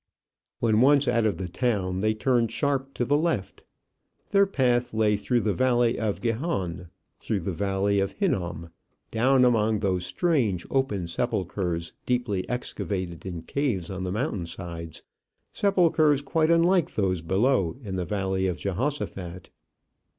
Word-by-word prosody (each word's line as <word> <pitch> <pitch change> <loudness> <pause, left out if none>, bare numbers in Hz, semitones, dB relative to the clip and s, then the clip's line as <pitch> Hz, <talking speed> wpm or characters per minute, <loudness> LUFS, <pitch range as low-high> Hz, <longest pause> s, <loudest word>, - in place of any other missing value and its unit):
When 110 -1 +2
once 140 +1 +5
out 115 -2 +3
of 105 - -1
the 95 - -4
town, 95 -2 -1
they 110 +2 +1
turned 115 0 +1
sharp 135 0 -1
to 120 - 0
the 145 +4 +2
left. 155 - -2 0.7
Their 200 0 +5
path 125 - +1
lay 110 -1 +3
through 120 +4 0
the 105 -2 0
valley 120 -1 +2
of 110 -3 -2
Gihon, 100 - -2 0.3
through 105 -4 -2
the 90 - -3
valley 100 +3 0
of 100 0 -1
Hinnom, 85 - -2 0.4
down 125 +3 +4
among 110 -3 +3
those 95 -3 0
strange, 115 - 0
open 120 -9 0
sepulchres, 90 -3 -2
deeply 120 -7 -1
excavated 95 -7 -4
in 85 -3 -5
caves 115 - -2
on 95 0 -4
the 90 - -2
mountain 105 - -2
sides 85 -2 -7 0.5
sepulchres 160 -7 +3
quite 155 +2 +1
unlike 170 +1 +3
those 95 -4 0
below 95 +3 +1
in 95 -3 -4
the 90 - -1
valley 95 0 -1
of 90 -2 -2
Jehoshaphat. 95 - -4
105 Hz, 145 wpm, -26 LUFS, 95-130 Hz, 0.7 s, once